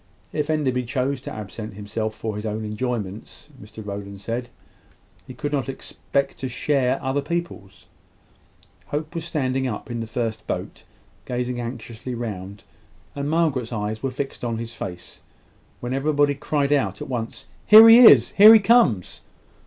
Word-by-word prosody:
If 150 0 -2
Enderby 135 -5 0
chose 130 +1 -2
to - - -7
absent 105 0 -7
himself 110 +2 -4
for 110 -1 -5
his 105 - -5
own 110 0 -3
enjoyments, 105 +2 -5
Mr 105 +1 -11
Rowland 100 -1 -7
said, 120 +4 -4 0.8
he 130 - -10
could 145 +4 -4
not 140 -2 -1
expect 140 +1 -3
to 130 - -4
share 130 0 0
other 135 +2 0
people's. 160 - -5 1.0
Hope 155 +2 -4
was 165 -2 -4
standing 130 -5 -1
up 115 +1 -6
in 120 - -3
the 115 - -4
first 115 -1 -4
boat, - - -5 0.4
gazing 125 0 -3
anxiously 120 0 -7
round, 100 -4 -6 0.5
and 140 0 -3
Margaret's 150 -8 0
eyes 110 -1 -3
were 135 - -1
fixed 135 +1 -6
on 115 -2 -2
his 115 0 -6
face, 90 -5 -8 0.6
when 120 +1 -3
every 140 +3 0
body 145 0 +3
cried 145 0 0
out 105 -9 0
at - - -6
once, 120 -4 -5 0.2
"Here 220 +1 +10
he 225 +1 +9
is! 140 - +8
here 215 +2 +9
he - - +7
comes!" 195 - +2
125 Hz, 160 wpm, -23 LUFS, 110-145 Hz, 1.0 s, Here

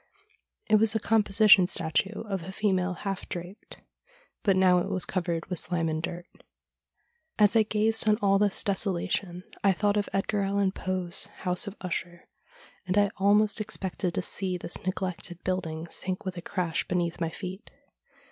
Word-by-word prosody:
It 215 - +5
was 220 +1 +2
a - - +2
composition 210 -3 +5
statue 185 +4 -1
of 195 -4 -3
a 180 +3 -7
female 190 -2 0
half 195 -1 -4
draped, 180 +3 -8 0.6
but 195 -3 +3
now 185 -1 +5
it - - -3
was 185 - +4
covered 170 -3 -2
with 180 -3 -2
slime 170 -2 -1
and 155 0 -2
dirt. 175 +1 -5 1.1
As 210 +1 +4
I 225 - +7
gazed 220 +1 +1
on 210 - +4
all 195 -2 +3
this 205 -1 +2
desolation 185 -2 -1 0.2
I 195 -1 +5
thought 205 +2 +1
of 205 - -1
Edgar 200 +1 0
Allan 195 0 +1
Poe's 185 -2 -2
' - - -18
House 180 +4 0
of 200 - -6
Usher,' 175 -1 -5 0.6
and 185 +2 0
I 205 0 +4
almost 205 +2 +3
expected 190 -4 -3
to - - -1
see 185 -2 0
this 175 - -4
neglected 185 -2 -4
building 165 -3 -2
sink 185 0 -2
with 185 -1 -3
a 175 - -6
crash 175 -2 -2
beneath 175 -1 -1
my 165 - 0
feet. 185 +4 -8
190 Hz, 170 wpm, -28 LUFS, 180-205 Hz, 1.1 s, I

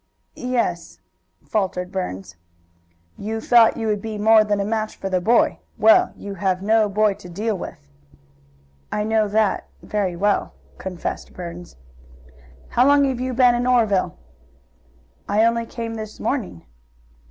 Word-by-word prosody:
"Ye 250 0 -4
es," 175 -8 -2 0.5
faltered 185 -4 -2
Burns. 95 - -5 0.8
"You 220 +2 -3
thought 230 0 +5
you 225 - -3
would 210 -2 0
be 220 0 -5
more 220 +1 +5
than 205 -1 0
a 200 - 0
match 215 0 -2
for 195 - -5
the 185 -1 +1
boy. 230 +6 +3 0.2
Well, 220 +1 +5
you 200 - -7
have 190 -1 -1
no 215 0 +3
boy 210 +1 +2
to 180 - -13
deal 210 +5 -2
with." 70 - -8 1.0
"I 210 - -1
know 220 0 +1
that 210 0 0 0.2
very 195 -4 -2
well," 205 +3 0 0.3
confessed 180 -2 -5
Burns. 175 0 -8 0.9
"How 250 +2 +3
long 285 0 +5
have 260 -3 -1
you 255 0 -3
been 250 -1 +5
in 240 +1 0
Oreville?" 220 - +2 1.1
"I 215 +2 +3
only 230 0 +1
came 230 -1 -5
this 215 -1 -7
morning." 215 - -3
215 Hz, 150 wpm, -22 LUFS, 190-230 Hz, 1.1 s, thought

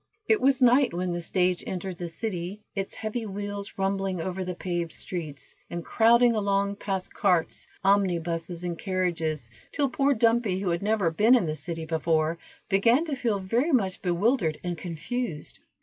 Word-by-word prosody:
It 435 -2 +3
was 265 -1 +3
night 250 -3 +5
when 180 0 -1
the 175 - -2
stage 180 +1 0
entered 185 -1 -4
the 175 - -3
city, 185 +2 -4
its 195 -1 -4
heavy 220 +1 -4
wheels 205 0 -5
rumbling 195 -1 -1
over 185 +2 -3
the 180 -1 -4
paved 175 -2 -3
streets, 155 -6 -7
and 170 0 -5
crowding 235 +1 +5
along 200 -1 0
past 190 -3 -3
carts, 180 -5 +1 0.2
omnibuses, 175 -3 +1
and 175 -2 -3
carriages, 165 - -1 0.2
till 280 -2 +1
poor 275 +2 +2
Dumpy, 225 -4 +2
who 190 -2 -1
had 170 - -1
never 205 -4 +1
been 215 +9 +5
in 235 - +2
the 155 - -1
city 160 +2 -4
before, 160 0 0 0.3
began 230 +10 +3
to 300 -4 -2
feel 240 -6 0
very 230 - 0
much 195 -9 +1
bewildered 180 - +1
and 175 -1 -2
confused. 170 +2 -5
190 Hz, 165 wpm, -27 LUFS, 170-220 Hz, 0.3 s, night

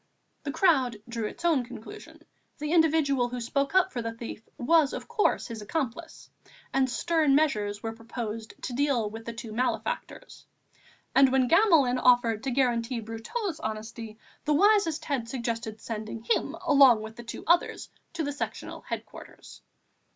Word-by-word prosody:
The 285 - -4
crowd 275 - +3
drew 230 -2 -3
its 340 - -8
own 310 -7 +3
conclusion, 250 - -11 0.3
the 300 0 -3
individual 305 -6 +3
who 250 0 -4
spoke 275 +6 -1
up 375 - +4
for 240 - -2
the 230 0 -3
thief 230 -2 -7 0.2
was 300 +2 +3
of - - -6
course 465 -3 +1
his 230 -3 -7
accomplice, 315 +6 -4 0.5
and 265 -1 +2
stern 310 +1 +2
measures 210 -9 +1
were 225 0 -3
proposed 225 -1 -6
to 250 - -4
deal 250 -5 +1
with 225 +1 -8
the 235 - -5
two 230 -1 -8
malefactors, 255 - -3 0.7
and 270 -1 +6
when 260 -1 +3
Gamelin 320 - +4
offered 245 -3 +4
to - - 0
guarantee 240 -2 +1
Brotteaux' 235 - -4
honesty, 220 0 -6 0.3
the 300 0 +2
wisest 400 -3 +3
heads 255 -6 -2
suggested 230 -3 -3
sending 220 0 -6
him 235 +6 0
along 270 -8 +6
with 220 0 -8
the 240 - -9
two 230 - -7
others 345 +1 +2 0.3
to 330 -1 -2
the 290 - -2
Sectional 285 - -5
headquarters. - - -9
250 Hz, 160 wpm, -28 LUFS, 230-305 Hz, 0.7 s, and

